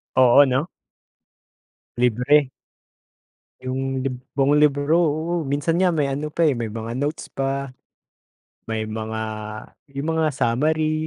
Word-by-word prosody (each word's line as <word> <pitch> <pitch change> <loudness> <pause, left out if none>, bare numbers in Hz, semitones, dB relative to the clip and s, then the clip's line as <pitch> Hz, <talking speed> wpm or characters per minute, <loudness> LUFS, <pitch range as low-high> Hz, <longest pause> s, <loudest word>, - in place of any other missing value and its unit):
Oo, 130 +2 +7
'no? 135 +5 0 1.3
Libre. 125 +4 +3 1.1
Yung 130 +1 -3
lib 130 0 -2 0.2
buong 140 +1 +2
libro, 150 +1 +3
oo, 165 0 +1
minsan 145 +4 -1
nga, 180 +1 +3
may 150 -4 0
ano 145 +3 -3
pa, 165 +1 +2
eh, 145 - +2
may 115 -2 -4
mga 115 +1 -5
notes 145 +4 -3
pa, 135 0 -2 1.0
may 110 -1 -2
mga 110 0 -5 0.9
yung 140 +3 -3
mga 160 - +2
summary, 155 +6 0
140 Hz, 125 wpm, -22 LUFS, 130-155 Hz, 1.3 s, Oo